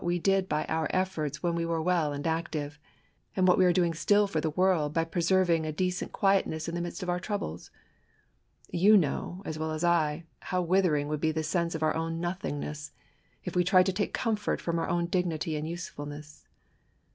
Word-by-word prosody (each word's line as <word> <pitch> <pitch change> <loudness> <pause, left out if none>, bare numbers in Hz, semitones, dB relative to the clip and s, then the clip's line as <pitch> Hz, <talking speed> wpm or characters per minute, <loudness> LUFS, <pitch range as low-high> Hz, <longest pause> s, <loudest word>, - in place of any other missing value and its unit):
we 175 0 +1
did; 195 +1 +1
by 150 0 0
oiir 160 -1 0
efforts 160 -6 -2
when 170 -1 +1
we 170 0 -1
were 165 -1 -1
welf 165 -2 +1
and. 145 0 -5
active, 160 -3 -2 0.6
and 185 -1 +3
what 180 - +6
we 185 - +4
iEtre 180 - +4
doing 175 -2 +2
still 205 +6 +3
for 165 -6 -2
the 160 - 0
world, 160 -3 +1
foy 165 0 +2
preserving 170 0 +2
a 155 - -2
decent 180 +3 -2
quietness 195 -5 +1
in 170 - -4
the 175 - -2
midst 175 +1 -5
of 180 - -4
our 175 - -1
troubles. 180 - -4 1.0
You 205 +5 +6
know, 175 +3 -1
as 155 0 -4
well 160 0 -2
as 155 +1 -3
Iv'.how 170 +2 0
withering 170 -5 +2
would 150 0 -3
be 160 - +2
the 155 0 -2
sense 170 +2 -1
of 160 - -3
our 155 - +2
own 165 0 -2
nothingness, 150 -4 -4 0.5
if - - -5
we 180 - +4
tried 185 0 +5
to 190 - 0
take 205 +2 -1
comfort 220 -3 -1
from 170 -1 -1
our - - -2
own 170 0 +1
dignity 170 -3 -1
and 150 +1 -3
usefulness. 150 -3 -8
170 Hz, 205 wpm, -29 LUFS, 155-180 Hz, 1.0 s, what